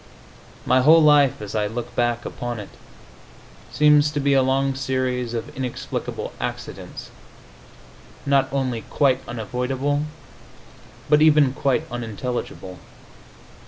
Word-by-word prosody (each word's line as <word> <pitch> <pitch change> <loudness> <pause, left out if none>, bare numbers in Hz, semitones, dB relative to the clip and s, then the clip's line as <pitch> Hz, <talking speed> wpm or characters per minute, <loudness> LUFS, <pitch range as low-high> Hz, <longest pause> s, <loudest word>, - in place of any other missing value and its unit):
My 130 0 +4
whole 160 +4 +6
life, 145 -6 +4
as 105 - -7
I 105 -1 0
look 115 +3 -6
back 120 0 0
upon 120 -2 -5
it, 105 - -8 1.0
seems 150 0 +4
to 145 0 -3
be 140 0 +2
a 135 - +5
long 135 +1 +1
series 130 -2 -2
of 115 - -6
inexplicable 130 -2 -5
accidents, - - -6 1.1
not 140 -1 +2
only 130 -4 -1
quite 135 -3 +2
unavoidable, 130 +6 -2 1.0
but 150 +1 +4
even 150 -4 +5
quite 135 +1 0
unintelligible. 115 -5 -5
130 Hz, 115 wpm, -22 LUFS, 120-140 Hz, 1.1 s, whole